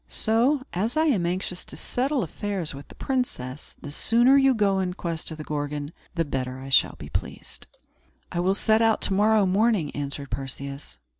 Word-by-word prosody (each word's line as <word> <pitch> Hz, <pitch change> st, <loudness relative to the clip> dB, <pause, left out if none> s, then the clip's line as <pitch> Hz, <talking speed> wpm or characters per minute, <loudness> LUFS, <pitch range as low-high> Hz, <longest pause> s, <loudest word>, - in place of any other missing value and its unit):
So, 245 Hz, +6 st, +2 dB
as 215 Hz, -, -1 dB
I 315 Hz, -, +4 dB
am 205 Hz, -, +2 dB
anxious 180 Hz, 0 st, -3 dB
to -, -, -10 dB
settle 265 Hz, +1 st, -1 dB
affairs 195 Hz, -7 st, -3 dB
with 140 Hz, +1 st, -10 dB
the -, -, -14 dB
princess, 150 Hz, -, -3 dB
the 145 Hz, -, -6 dB
sooner 240 Hz, -, +4 dB
you 270 Hz, -2 st, +5 dB
go 200 Hz, -3 st, +2 dB
in 180 Hz, -1 st, -1 dB
quest 170 Hz, -3 st, -3 dB
of 160 Hz, -, -7 dB
the 155 Hz, -, -6 dB
Gorgon, 145 Hz, 0 st, -3 dB, 0.2 s
the 165 Hz, -1 st, +1 dB
better 130 Hz, -2 st, -3 dB
I 135 Hz, +1 st, -8 dB
shall 135 Hz, -, +4 dB
be -, -, -9 dB
pleased." -, -, -6 dB, 0.6 s
"I 175 Hz, -, -2 dB
will 185 Hz, +2 st, +2 dB
set 220 Hz, +2 st, +3 dB
out 225 Hz, -1 st, +3 dB
to -, -, +1 dB
morrow 210 Hz, +1 st, +4 dB
morning," 195 Hz, -4 st, +2 dB
answered 140 Hz, -1 st, -4 dB
Perseus. 140 Hz, +1 st, -5 dB
185 Hz, 190 wpm, -25 LUFS, 145-225 Hz, 0.6 s, you